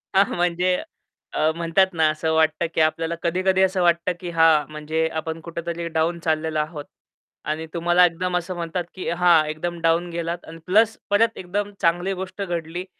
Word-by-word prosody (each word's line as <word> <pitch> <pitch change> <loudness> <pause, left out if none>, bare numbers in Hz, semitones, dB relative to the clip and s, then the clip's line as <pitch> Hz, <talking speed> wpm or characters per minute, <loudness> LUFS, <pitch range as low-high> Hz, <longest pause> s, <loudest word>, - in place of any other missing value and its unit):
हां, 195 +1 +6
म्हणजे 180 +1 +1 0.6
अ, 155 - +2
म्हणतात 170 +3 +2
ना, 160 -2 +3
असं 155 +1 -1
वाटतं 160 +1 +2
की - - +2
आपल्याला 165 +1 +1
कधी-कधी 185 +2 +1
असं 190 0 +2
वाटतं 170 0 +2
की 175 - -6
हां, 160 -2 +4
म्हणजे 155 +1 -1
आपण 160 +1 -5
कुठेतरी 170 0 -5
डाउन 165 +1 0
चाललेलो 160 -1 0
आहोत. 150 -1 -4 0.6
आणि 155 +1 -2
तुम्हाला 175 +1 +4
एकदम 180 +1 -1
असं 180 +1 -4
म्हणतात 170 +1 -3
की 185 - -4
हां, 170 -2 +4
एकदम 170 +3 -4
डाउन 165 +1 +2
गेलात 170 0 -4
आणि 165 - -9
प्लस 220 +4 +3
परत 225 +3 +2
एकदम 205 +3 -3
चांगली 175 +3 +1
गोष्ट 190 +2 -7
घडली 175 -1 -4
170 Hz, 170 wpm, -23 LUFS, 160-180 Hz, 0.6 s, हां